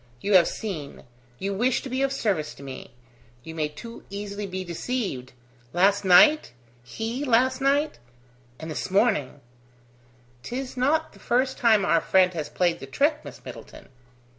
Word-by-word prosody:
You 200 Hz, +10 st, -1 dB
have 180 Hz, -3 st, +7 dB
seen 165 Hz, -10 st, -6 dB, 0.3 s
you 195 Hz, +6 st, -3 dB
wish 245 Hz, +5 st, +1 dB
to 270 Hz, -, -6 dB
be 260 Hz, +1 st, -1 dB
of 275 Hz, 0 st, +1 dB
service 190 Hz, -, -1 dB
to -, -, -12 dB
me; 135 Hz, -1 st, -8 dB, 0.5 s
you 160 Hz, -, -8 dB
may 155 Hz, -2 st, -1 dB
too 230 Hz, +10 st, -10 dB
easily 200 Hz, 0 st, -5 dB
be 185 Hz, 0 st, -4 dB
deceived. 175 Hz, -, -4 dB, 0.4 s
Last 200 Hz, +3 st, +3 dB
night? 200 Hz, +12 st, +6 dB, 0.3 s
he 225 Hz, -, -4 dB
last 260 Hz, +1 st, +2 dB
night...? 280 Hz, -, +1 dB, 0.6 s
And 160 Hz, 0 st, -6 dB
this 155 Hz, -, -4 dB
morning!" 195 Hz, -, +1 dB, 1.0 s
"'Tis 255 Hz, -, -5 dB
not 295 Hz, +5 st, +1 dB
the -, -, -17 dB
first 255 Hz, +2 st, 0 dB
time 220 Hz, -5 st, +4 dB
our 165 Hz, -4 st, +3 dB
friend 185 Hz, -1 st, +3 dB
has 155 Hz, -3 st, -4 dB
played 175 Hz, -2 st, 0 dB
the 135 Hz, -, -9 dB
trick, 295 Hz, -, +1 dB
Miss -, -, -11 dB
Middleton." -, -, -11 dB
205 Hz, 160 wpm, -25 LUFS, 170-255 Hz, 1.0 s, have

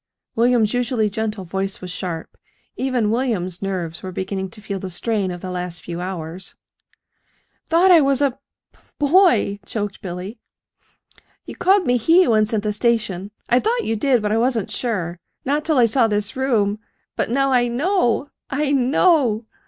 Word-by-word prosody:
William's 230 Hz, -2 st, +3 dB
usually 245 Hz, -4 st, 0 dB
gentle 220 Hz, -2 st, -3 dB
voice 195 Hz, +2 st, -3 dB
was 180 Hz, -1 st, -7 dB
sharp. 175 Hz, -3 st, -5 dB, 0.4 s
Even 250 Hz, -5 st, 0 dB
William's 210 Hz, -8 st, -1 dB
nerves 180 Hz, -5 st, -3 dB
were 185 Hz, -, -6 dB
beginning 190 Hz, +1 st, -4 dB
to 215 Hz, -, -12 dB
feel 200 Hz, -2 st, -5 dB
the 190 Hz, -, -6 dB
strain 200 Hz, +1 st, -1 dB
of 175 Hz, -1 st, -6 dB
the 185 Hz, -, -5 dB
last 180 Hz, -1 st, -5 dB
few 175 Hz, 0 st, -5 dB
hours. 180 Hz, 0 st, -6 dB, 1.1 s
"Thought 345 Hz, +3 st, +5 dB
I 335 Hz, -3 st, +8 dB
was 275 Hz, -1 st, +2 dB
a 285 Hz, -2 st, +2 dB, 0.4 s
b -, -, -27 dB, 0.2 s
boy!" 285 Hz, -, +3 dB
choked 205 Hz, 0 st, -4 dB
Billy. 185 Hz, +5 st, -6 dB, 1.1 s
"You -, -, -8 dB
called 385 Hz, 0 st, +3 dB
me 245 Hz, 0 st, +3 dB
'he' 330 Hz, +10 st, +4 dB
once 215 Hz, -2 st, +2 dB
in 220 Hz, -2 st, 0 dB
the 210 Hz, 0 st, -2 dB
station 205 Hz, -4 st, 0 dB, 0.2 s
I 245 Hz, -, +4 dB
thought 470 Hz, -, 0 dB
you 225 Hz, -, 0 dB
did; 245 Hz, 0 st, +2 dB
but 210 Hz, -, 0 dB
I 220 Hz, -, +2 dB
wasn't 235 Hz, -4 st, 0 dB
sure 180 Hz, -8 st, -2 dB, 0.3 s
not 290 Hz, +3 st, 0 dB
till 310 Hz, -2 st, +1 dB
I 245 Hz, -, +6 dB
saw 230 Hz, +1 st, +3 dB
this 205 Hz, -1 st, -2 dB
room. 220 Hz, -6 st, +1 dB, 0.4 s
But -, -, -1 dB
now 275 Hz, +3 st, +1 dB
I 245 Hz, -1 st, +3 dB
know 280 Hz, -, 0 dB, 0.2 s
I 285 Hz, +1 st, 0 dB
know!" 265 Hz, -, +3 dB
220 Hz, 170 wpm, -21 LUFS, 190-265 Hz, 1.1 s, I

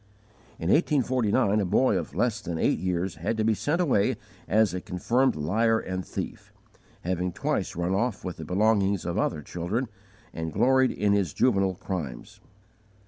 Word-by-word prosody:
_ -, -, -31 dB, 0.5 s
In 85 Hz, -, -1 dB
1849, 130 Hz, -, +2 dB
a 100 Hz, -, +1 dB
boy, 130 Hz, +8 st, +3 dB
of -, -, -3 dB
less 115 Hz, -2 st, 0 dB
than 85 Hz, -3 st, -4 dB
eight -, -, +1 dB
years, 90 Hz, 0 st, -2 dB
had 100 Hz, +8 st, -2 dB
to 110 Hz, -, +1 dB
be 110 Hz, 0 st, +3 dB
sent 150 Hz, -, -1 dB
away 135 Hz, -, +2 dB, 0.3 s
as 110 Hz, -2 st, +3 dB
a 90 Hz, -, -3 dB
confirmed 115 Hz, +10 st, +1 dB
liar 110 Hz, +10 st, +2 dB
and 95 Hz, -3 st, -4 dB
thief, -, -, -6 dB, 0.5 s
having 90 Hz, 0 st, -1 dB
twice -, -, -2 dB
run 85 Hz, +2 st, -1 dB
off 110 Hz, 0 st, -1 dB
with 90 Hz, -, -4 dB
the 80 Hz, -, -7 dB
belongings 100 Hz, +1 st, +2 dB
of 90 Hz, +4 st, -1 dB
other 75 Hz, -7 st, -1 dB
children 90 Hz, -, -3 dB, 0.5 s
and 80 Hz, -1 st, -4 dB
gloried 130 Hz, 0 st, +4 dB
in 100 Hz, -1 st, +1 dB
his 95 Hz, -7 st, +1 dB
juvenile 95 Hz, -6 st, +2 dB
crimes. 85 Hz, -10 st, -6 dB
100 Hz, 170 wpm, -27 LUFS, 90-115 Hz, 0.5 s, gloried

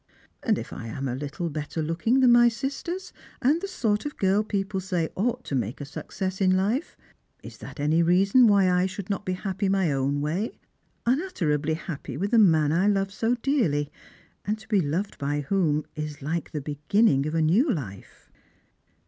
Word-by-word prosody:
And -, -, +1 dB
if -, -, -7 dB
I 115 Hz, -, -7 dB
am 130 Hz, +5 st, -4 dB
a 125 Hz, -, -2 dB
little 145 Hz, +6 st, -4 dB
better 150 Hz, +2 st, -5 dB
looking 200 Hz, +12 st, +1 dB
than 250 Hz, -2 st, +6 dB
my 240 Hz, 0 st, +7 dB
Bisters, 280 Hz, +10 st, -4 dB, 0.3 s
and 290 Hz, +7 st, +2 dB
the 395 Hz, -, -3 dB
sort 220 Hz, -, 0 dB
of 295 Hz, -, -6 dB
girl 195 Hz, +2 st, +2 dB
people 195 Hz, -2 st, -2 dB
say 180 Hz, -3 st, -1 dB
ought 245 Hz, +5 st, -1 dB
to -, -, -7 dB
make 120 Hz, -2 st, -2 dB
a 145 Hz, -, -5 dB
success 185 Hz, +6 st, -5 dB
in 185 Hz, -1 st, +4 dB
life, 220 Hz, -, -1 dB, 0.5 s
ia -, -, -7 dB
that -, -, -10 dB
any 155 Hz, +3 st, +2 dB
reason 195 Hz, +8 st, +5 dB
why 200 Hz, -3 st, +5 dB
I 180 Hz, +1 st, +2 dB
should 195 Hz, +1 st, -6 dB
not 200 Hz, -, -3 dB
be 185 Hz, -, 0 dB
happy 195 Hz, +1 st, -2 dB
my 190 Hz, -5 st, +2 dB
own 140 Hz, +1 st, 0 dB
way, 165 Hz, +10 st, -2 dB, 0.5 s
un 255 Hz, +6 st, +2 dB
utterably 155 Hz, -, -1 dB
happy 160 Hz, -2 st, -6 dB
with 200 Hz, +3 st, -2 dB
the 235 Hz, -, +5 dB
man 160 Hz, -7 st, +4 dB
I 180 Hz, +5 st, +2 dB
love 195 Hz, -1 st, +1 dB
so 225 Hz, +4 st, 0 dB
dearly, 220 Hz, -, 0 dB, 0.5 s
and 210 Hz, +1 st, -1 dB
tt> 215 Hz, 0 st, -17 dB
be 205 Hz, -4 st, +3 dB
loved 170 Hz, +7 st, -2 dB
by 145 Hz, +1 st, -1 dB
whom 155 Hz, -2 st, +1 dB
is 150 Hz, -1 st, -5 dB
hke 155 Hz, +4 st, -3 dB
the 150 Hz, -, -4 dB
beginning 150 Hz, +2 st, +2 dB
of 155 Hz, -, -3 dB
a 165 Hz, -, +2 dB
new 215 Hz, -, +3 dB
life 110 Hz, -, -7 dB
185 Hz, 195 wpm, -26 LUFS, 150-215 Hz, 0.5 s, my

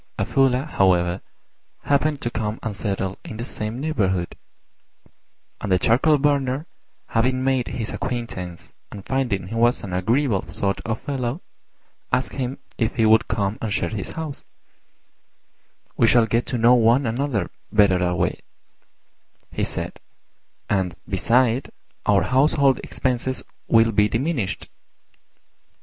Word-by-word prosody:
A -, -, 0 dB
Fuller, 135 Hz, -1 st, +2 dB
however, 90 Hz, -, +2 dB, 0.6 s
happened 145 Hz, 0 st, +1 dB
to 120 Hz, -, -1 dB
come 110 Hz, -1 st, -2 dB
and 110 Hz, -3 st, -3 dB
settle 95 Hz, -2 st, -3 dB
in 110 Hz, -, -8 dB
the 115 Hz, -, -4 dB
same 110 Hz, -1 st, -4 dB
neighbourhood; 95 Hz, -, -1 dB, 1.3 s
and -, -, -3 dB
the 90 Hz, -, +5 dB
Charcoal 130 Hz, -, +3 dB
burner, 140 Hz, 0 st, +1 dB, 0.4 s
having 130 Hz, +3 st, +1 dB
made 130 Hz, -2 st, +1 dB
his 115 Hz, -2 st, -3 dB
acquaintance 115 Hz, -9 st, -5 dB, 0.2 s
and 100 Hz, -, -9 dB
finding 125 Hz, -9 st, -1 dB
he -, -, -6 dB
was 120 Hz, +2 st, +2 dB
an 95 Hz, -3 st, -5 dB
agreeable 110 Hz, +4 st, +1 dB
sort 100 Hz, -1 st, -1 dB
of 110 Hz, 0 st, -1 dB
fellow, 135 Hz, +2 st, -3 dB, 0.7 s
asked 130 Hz, -, 0 dB
him 130 Hz, -1 st, -3 dB, 0.2 s
if 115 Hz, -, 0 dB
he 115 Hz, -, +3 dB
would 110 Hz, 0 st, +5 dB
come 100 Hz, 0 st, -1 dB
and 110 Hz, -, -2 dB
share 100 Hz, -, 0 dB
his 105 Hz, -3 st, -5 dB
house: 155 Hz, -3 st, -6 dB, 1.5 s
"We 115 Hz, -, +4 dB
shall 120 Hz, 0 st, +5 dB
get 115 Hz, +2 st, 0 dB
to 125 Hz, -, -1 dB
know 120 Hz, +2 st, +6 dB
one 120 Hz, +3 st, +4 dB
another 115 Hz, -4 st, -1 dB, 0.2 s
better 100 Hz, -3 st, +4 dB
that 90 Hz, 0 st, 0 dB
way," -, -, 0 dB, 1.1 s
he -, -, -2 dB
said, -, -, -4 dB, 0.7 s
"and, 95 Hz, -4 st, 0 dB
beside, 120 Hz, +6 st, +2 dB, 0.4 s
our -, -, +4 dB
household 135 Hz, 0 st, +3 dB
expenses 130 Hz, 0 st, -2 dB, 0.2 s
will 115 Hz, 0 st, +5 dB
be 105 Hz, 0 st, +3 dB
diminished." 120 Hz, -, -2 dB
115 Hz, 135 wpm, -23 LUFS, 100-130 Hz, 1.5 s, know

